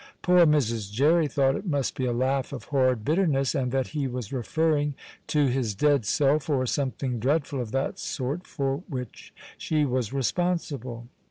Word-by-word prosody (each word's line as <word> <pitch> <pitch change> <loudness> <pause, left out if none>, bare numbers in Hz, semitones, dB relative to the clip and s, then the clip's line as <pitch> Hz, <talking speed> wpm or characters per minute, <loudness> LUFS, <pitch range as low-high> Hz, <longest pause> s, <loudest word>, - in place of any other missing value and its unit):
Poor 180 -2 +6
Mrs. 115 -9 +1
Jerry 150 +8 +3
thought 135 -2 +2
it - - -5
must 145 -5 -1
be 130 - -1
a - - +1
laugh 130 +2 0
of 140 - -6
horrid 130 -5 +2
bitterness, 150 -5 +2
and 130 -5 -1
that 130 -1 0
he 145 -3 -2
was 125 -2 -5
referring 145 +3 0 0.3
to 150 -2 +2
his 125 -5 0
dead 140 -1 +2
self 145 +3 +2
or 130 -3 +1
something 130 -1 -2
dreadful 140 +2 0
of 115 -3 -6
that 135 +1 -2
sort, 145 +6 -3
for 135 -2 -1
which 125 -4 -7 0.3
she 155 -2 +1
was 125 -5 -1
responsible. 135 -4 -2
135 Hz, 170 wpm, -26 LUFS, 125-150 Hz, 0.3 s, Poor